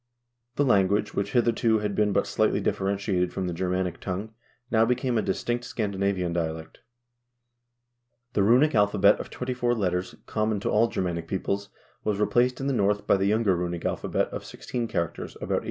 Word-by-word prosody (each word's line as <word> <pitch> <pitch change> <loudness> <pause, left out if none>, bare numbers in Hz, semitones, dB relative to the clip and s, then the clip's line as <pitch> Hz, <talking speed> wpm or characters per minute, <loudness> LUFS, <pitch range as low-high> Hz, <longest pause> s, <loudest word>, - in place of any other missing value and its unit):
The 145 - +2
language, 100 -4 +2
which 100 +1 -2
hitherto 115 -2 +3
had 105 -1 -2
been 105 0 +2
but - - +2
slightly - - +1
differentiated 95 -2 0
from 95 - -3
the 90 - -2
Germanic 90 0 -1
tongue, 100 +4 -4 0.4
now 110 -1 +4
became 125 +1 0
a 110 - +3
distinct 120 +5 -2
Scandinavian 100 -6 -1
dialect. 80 -1 -4 1.5
The 105 - +2
runic 125 +9 +4
alphabet 100 -2 +4
of - - -6
twenty 125 0 -4
four 120 -1 0
characters, 90 -3 -1
common 105 -1 -1
to - - -1
all 115 +2 +4
Ger 95 - -2
manic 85 -2 -3
peoples, 100 +2 -2 0.3
was 105 -2 0
replaced 125 +4 +2
in 135 - -3
the 140 - +1
North 105 -3 +1
by - - +4
the 95 0 +1
younger 105 -2 +2
runic 85 -1 -3
alpha - - -2
bet - - 0
of - - -6
sixteen 120 -2 -4
characters 85 -6 -3
about - - -2
850. - - +2
100 Hz, 185 wpm, -26 LUFS, 95-115 Hz, 1.5 s, now